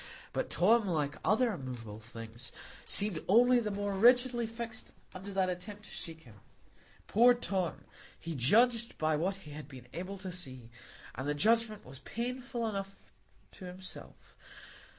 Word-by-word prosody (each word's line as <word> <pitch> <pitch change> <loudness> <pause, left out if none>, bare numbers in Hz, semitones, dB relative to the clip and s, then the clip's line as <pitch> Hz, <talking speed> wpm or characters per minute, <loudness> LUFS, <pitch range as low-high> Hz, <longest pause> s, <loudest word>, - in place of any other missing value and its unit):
But - - -2
Tom, 215 +4 +4
like 150 -5 -1
other 225 +3 +3
immovable 120 - -7
things, 115 +2 -7 0.4
seemed 200 -6 +6
only 245 +5 +6
the 220 -3 -2
more 205 0 -2
rigidly 240 +3 +4
fixed 230 0 -7 0.2
under 190 +2 -8
that 190 -1 +1
attempt 200 +3 -6
to - - -13
shake 160 -1 -7
him. 110 -4 -16 0.7
Poor 245 +3 +5
Tom! 190 -8 -2 0.4
he 165 - -5
judged 230 - +3
by 155 0 +1
what 180 +6 0
he 150 - -10
had 150 -1 -8
been 130 -4 -12
able 185 +3 -5
to 185 -1 -6
see; 130 -10 -5 0.4
and 130 +3 -5
the 145 - 0
judgment 220 +5 +2
was 130 +1 -10
painful 245 - -4
enough 195 -2 -4 0.6
to 185 - -11
himself. 180 +1 -10
190 Hz, 150 wpm, -32 LUFS, 150-225 Hz, 0.7 s, seemed